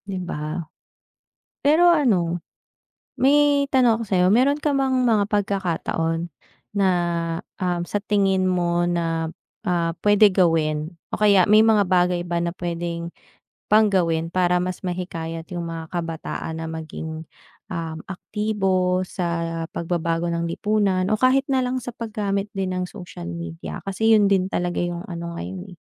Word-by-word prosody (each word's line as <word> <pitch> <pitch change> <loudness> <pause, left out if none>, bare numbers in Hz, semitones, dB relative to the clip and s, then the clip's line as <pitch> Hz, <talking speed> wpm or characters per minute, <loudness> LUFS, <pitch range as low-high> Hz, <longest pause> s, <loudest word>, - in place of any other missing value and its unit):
'Di 195 -2 -4
ba? 155 +2 -4 1.0
Pero 325 +5 +6
ano, 190 - +2 0.8
may 285 +1 +4
tanong 245 -4 +4
ako, - - -2
sa'yo. 185 -2 +3
Meron 275 +5 +3
ka 300 -1 0
bang 270 -1 +1
mga 215 -4 +3
pagkakataon 175 -5 -1 0.4
na, 200 -1 +3 0.7
um, 180 -2 0
sa 205 - -2
tingin 195 -3 +2
mo 175 -1 +1
na, 165 -2 -1 0.4
ah, 170 -2 +1
pwede 205 0 +6
gawin 160 -4 +1 0.2
o - - -2
kaya 200 -3 +5
may 210 +1 +6
mga 220 -2 +4
bagay 180 -1 +2
ba 170 -1 -1
na 170 - -1
pwedeng 170 -1 -3 0.6
pang 215 +1 +6
gawin 165 -4 +1
para 180 -1 +3
mas 180 +1 -3
mahikayat 165 -3 -4
yung 175 - -3
mga 165 -1 -6
kabataan 165 -1 -4
na 165 - -4
maging, 160 0 -6 0.5
um, 165 -3 -4
aktibo 185 -2 0
sa 170 -2 -2
pagbabago 170 0 -1
ng 170 0 -1
lipunan 195 -1 +1
o 215 - +2
kahit 265 +1 +4
na 265 -2 +1
lang 250 +1 -1
sa 245 -1 -7
paggamit 210 -3 -3
din 190 -1 -2
ng 180 0 -1
social 175 - -9
media? 85 -2 -6
Kasi 210 +3 +1
yun 205 -1 +4
din 190 -2 +2
talaga 175 -1 -1
yung 175 0 -3
ano 170 -2 -6
ngayon, 185 0 -7
eh. - - -56
180 Hz, 150 wpm, -23 LUFS, 170-210 Hz, 1.0 s, Pero